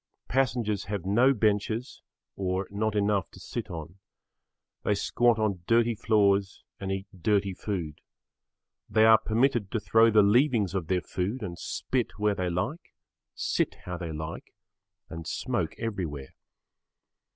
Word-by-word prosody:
Passengers 120 Hz, -6 st, 0 dB
have 100 Hz, -2 st, -4 dB
no 120 Hz, +8 st, +4 dB
benches 110 Hz, +1 st, 0 dB, 0.3 s
or 95 Hz, 0 st, -2 dB
not 105 Hz, +1 st, -1 dB
enough 100 Hz, -3 st, +1 dB
to -, -, -15 dB
sit -, -, -5 dB
on. 80 Hz, +3 st, -8 dB, 0.8 s
They 105 Hz, -, +2 dB
squat 120 Hz, +3 st, +2 dB
on 105 Hz, -5 st, 0 dB
dirty 115 Hz, 0 st, +3 dB
floors 100 Hz, -3 st, +2 dB, 0.2 s
and 95 Hz, -1 st, -3 dB
eat 95 Hz, 0 st, -3 dB, 0.2 s
dirty 100 Hz, 0 st, +2 dB
food. 90 Hz, -7 st, -4 dB, 0.9 s
They 110 Hz, 0 st, +4 dB
are 110 Hz, 0 st, +7 dB
permitted 115 Hz, -1 st, +1 dB
to 110 Hz, -, -1 dB
throw 110 Hz, +3 st, +4 dB
the 105 Hz, -1 st, +5 dB
leavings 110 Hz, -, +3 dB
of 95 Hz, -5 st, -2 dB
their 90 Hz, 0 st, +1 dB
food 100 Hz, +9 st, -3 dB
and 90 Hz, -4 st, -5 dB
spit 125 Hz, -3 st, -2 dB
where 105 Hz, -1 st, +2 dB
they 90 Hz, -2 st, -2 dB
like, 90 Hz, -, -4 dB, 0.4 s
sit -, -, 0 dB
how 90 Hz, 0 st, -4 dB
they 85 Hz, -2 st, -5 dB
like 80 Hz, +1 st, -7 dB, 0.5 s
and 80 Hz, -1 st, -8 dB
smoke -, -, -2 dB
everywhere. 85 Hz, -, -4 dB
100 Hz, 140 wpm, -28 LUFS, 95-110 Hz, 0.9 s, are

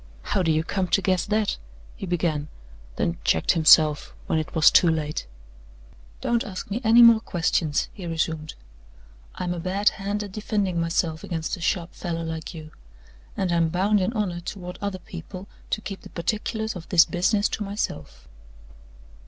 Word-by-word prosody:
"How 200 Hz, -, 0 dB
do 165 Hz, -3 st, +2 dB
you 155 Hz, 0 st, +1 dB
come 190 Hz, +2 st, -1 dB
to 195 Hz, -, +2 dB
guess 185 Hz, -1 st, +1 dB
that?" 215 Hz, 0 st, 0 dB, 0.4 s
he 195 Hz, -, -7 dB
began, 160 Hz, -4 st, -1 dB, 0.5 s
then 85 Hz, 0 st, -1 dB
checked 80 Hz, -, +2 dB
himself, 155 Hz, -2 st, +5 dB
when 160 Hz, -, 0 dB
it 155 Hz, -, -6 dB
was 160 Hz, -, +6 dB
too 175 Hz, -, +5 dB
late. 150 Hz, -, -2 dB, 0.9 s
"Don't 235 Hz, 0 st, +1 dB
ask 195 Hz, -2 st, -7 dB
me 230 Hz, +5 st, -2 dB
any 230 Hz, +2 st, +7 dB
more 230 Hz, -1 st, +8 dB
questions," 165 Hz, -6 st, 0 dB
he 190 Hz, -5 st, -8 dB
resumed. 160 Hz, -1 st, -2 dB, 0.8 s
"I'm 175 Hz, -1 st, -2 dB
a 175 Hz, -, -5 dB
bad 190 Hz, +4 st, +2 dB
hand 205 Hz, +1 st, -3 dB
at 200 Hz, -, -8 dB
defending 200 Hz, -4 st, -1 dB
myself 165 Hz, -1 st, -1 dB
against 165 Hz, -3 st, -3 dB
a 175 Hz, -, -12 dB
sharp 170 Hz, 0 st, -1 dB
fellow 165 Hz, -2 st, -4 dB
like 160 Hz, -1 st, -5 dB
you; 155 Hz, -2 st, -10 dB, 0.7 s
and 185 Hz, -2 st, 0 dB
I'm 170 Hz, -1 st, +2 dB
bound 195 Hz, +4 st, +2 dB
in 185 Hz, -, 0 dB
honor 200 Hz, -6 st, -2 dB
toward 180 Hz, 0 st, -7 dB
other 200 Hz, -2 st, -2 dB
people 185 Hz, +2 st, -9 dB, 0.2 s
to 215 Hz, -, -1 dB
keep 195 Hz, -2 st, -7 dB
the -, -, -12 dB
particulars 220 Hz, +4 st, -3 dB
of 175 Hz, -2 st, -9 dB
this 175 Hz, -3 st, +6 dB
business 200 Hz, +4 st, +1 dB
to 210 Hz, -, -3 dB
myself." 200 Hz, -, -5 dB
180 Hz, 170 wpm, -24 LUFS, 165-200 Hz, 0.9 s, more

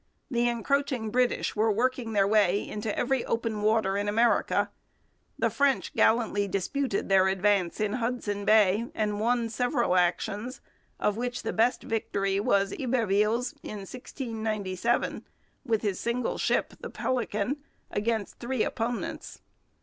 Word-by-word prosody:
The 240 Hz, -1 st, +2 dB
encroaching 250 Hz, -1 st, -1 dB
British 250 Hz, +1 st, +1 dB
were 220 Hz, +1 st, +3 dB
working 240 Hz, +1 st, 0 dB
their 200 Hz, -2 st, +4 dB
way 205 Hz, -2 st, +3 dB
into 210 Hz, 0 st, -4 dB
every 260 Hz, 0 st, +1 dB
open 230 Hz, -2 st, -2 dB
water 210 Hz, -2 st, +2 dB
in 205 Hz, 0 st, -1 dB
America. 230 Hz, +3 st, +2 dB, 0.7 s
The -, -, +1 dB
French 280 Hz, -2 st, +1 dB
gallantly 220 Hz, -3 st, +2 dB
disputed 200 Hz, +5 st, -1 dB
their 190 Hz, -1 st, +5 dB
advance 190 Hz, -2 st, +1 dB
in 210 Hz, -1 st, 0 dB
Hudson 230 Hz, -4 st, -2 dB
Bay 215 Hz, +1 st, +4 dB
and 210 Hz, -1 st, -1 dB
won 235 Hz, +1 st, +1 dB
several 240 Hz, -2 st, 0 dB
actions, 200 Hz, +7 st, 0 dB, 0.4 s
of 210 Hz, 0 st, +1 dB
which 245 Hz, +1 st, -3 dB
the -, -, -2 dB
best 235 Hz, +3 st, +2 dB
victory 195 Hz, -3 st, -1 dB
was 200 Hz, -3 st, +2 dB
Iberville's 230 Hz, -1 st, +1 dB
in 205 Hz, -6 st, -7 dB
1697, 220 Hz, -3 st, -2 dB, 0.4 s
with 230 Hz, -5 st, 0 dB
his 200 Hz, -3 st, -1 dB
single 235 Hz, +1 st, -1 dB
ship, -, -, +1 dB
the -, -, -7 dB
Pélican, 240 Hz, 0 st, -1 dB, 0.3 s
against 215 Hz, 0 st, -2 dB
three 245 Hz, -1 st, -1 dB
opponents. 255 Hz, +7 st, -4 dB
220 Hz, 135 wpm, -28 LUFS, 205-245 Hz, 0.7 s, their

